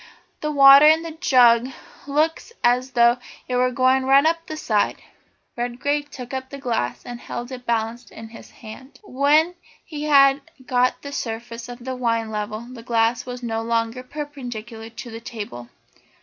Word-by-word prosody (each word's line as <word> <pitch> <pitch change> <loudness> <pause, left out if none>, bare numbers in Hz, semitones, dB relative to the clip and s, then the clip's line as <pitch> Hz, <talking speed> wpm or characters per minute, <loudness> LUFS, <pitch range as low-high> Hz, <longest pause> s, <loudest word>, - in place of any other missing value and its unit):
the 305 - -3
water 280 0 +8
in 320 +1 +5
the 330 - -6
jug 250 -7 +4 0.4
looks 310 +8 0
as 250 +2 +2
though 240 0 +4 0.3
it 250 - -2
were 250 0 +3
going 255 +1 +2
to 260 - -5
run 275 +2 +5
up 330 +1 0
the 310 - -6
side." 215 -8 0 0.6
Redgrave 285 +5 -2
took 250 -2 -9
up 260 0 -4
the 280 - -8
glass 235 - -3
and 240 -1 -7
held 240 +1 -7
it 250 -1 -9
balanced 230 +1 -2
in 225 0 -11
his 225 - -13
hand. 250 +4 -13
When 305 +1 +2 0.3
he 300 -2 -6
had 275 -1 +5 0.2
got 250 0 +1
the 280 - -7
surface 230 -2 -6
of 240 0 -10
the 260 0 -3
wine 230 -3 -1
level 215 0 -4
the 240 0 -11
glass 230 +1 0
was 250 0 -7
no 225 -1 -2
longer 230 +1 -1
perpendicular 245 -5 -8
to 230 +1 -9
the 225 +1 -8
table. 205 - -8
250 Hz, 175 wpm, -22 LUFS, 230-275 Hz, 0.6 s, water